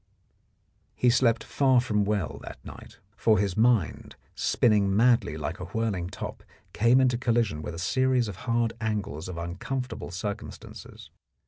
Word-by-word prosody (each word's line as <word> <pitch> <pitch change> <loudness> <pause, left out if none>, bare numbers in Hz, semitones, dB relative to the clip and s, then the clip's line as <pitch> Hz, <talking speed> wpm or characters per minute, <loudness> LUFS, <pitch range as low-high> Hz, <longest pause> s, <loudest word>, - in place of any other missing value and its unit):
He 125 - +3
slept 115 -3 +2
far 130 -3 +3
from 105 -4 0
well 100 -8 -2
that - - -9
night, - - -11 0.2
for 110 -2 +3
his 100 -1 0
mind, 110 - +1 0.2
spinning 105 -4 +2
madly 115 -8 +3
like 80 +5 -4
a - - -5
whirling 105 -6 -2
top, - - -7 0.3
came 120 +4 +4
into 125 -2 +2
collision 115 -10 0
with 80 - -6
a - - -8
series 130 +5 +1
of 100 -3 -7
hard 115 -1 +1
angles 100 -8 -3
of 90 - -6
uncomfortable 110 +9 -4
circumstances. 100 +4 -7
110 Hz, 145 wpm, -27 LUFS, 95-120 Hz, 0.3 s, came